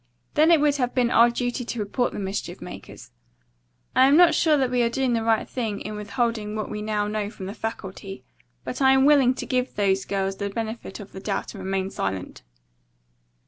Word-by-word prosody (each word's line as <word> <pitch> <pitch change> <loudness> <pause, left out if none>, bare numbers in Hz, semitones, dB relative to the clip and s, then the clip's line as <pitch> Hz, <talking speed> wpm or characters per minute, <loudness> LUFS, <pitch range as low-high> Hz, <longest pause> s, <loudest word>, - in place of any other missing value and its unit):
Then 310 +2 +4
it 335 -2 +6
would 290 -1 +2
have 250 -2 -1
been 245 -2 +2
our 235 +1 +6
duty 245 +1 -2
to 240 0 -5
report 215 +4 -1
the - - -7
mischief 195 0 -4
makers. - - -10 0.8
I 260 +1 +6
am 285 +3 +5
not 345 -2 +7
sure 305 -1 +3
that 260 -3 0
we 250 -1 +2
are 235 - +2
doing 255 +1 0
right 225 -1 +1
in 215 -3 -3
withholding 215 0 -2
what 215 -1 -4
we 210 0 -4
now 210 -1 -1
know 210 -1 -2
from 195 -3 -9
the 195 - -5
faculty, 195 -3 -6 0.4
but - - -5
I 265 0 +6
am 265 0 +4
willing 275 -4 +5
to - - -5
give 255 0 -1
these 195 -1 +1
girls 195 -1 -2
the 200 0 -3
benefit 220 -1 -5
of 205 - -10
the 190 - -8
doubt 195 0 -3
and 195 -3 -8
remain 190 0 -2
silent." 95 -1 -4
225 Hz, 205 wpm, -24 LUFS, 200-255 Hz, 0.8 s, not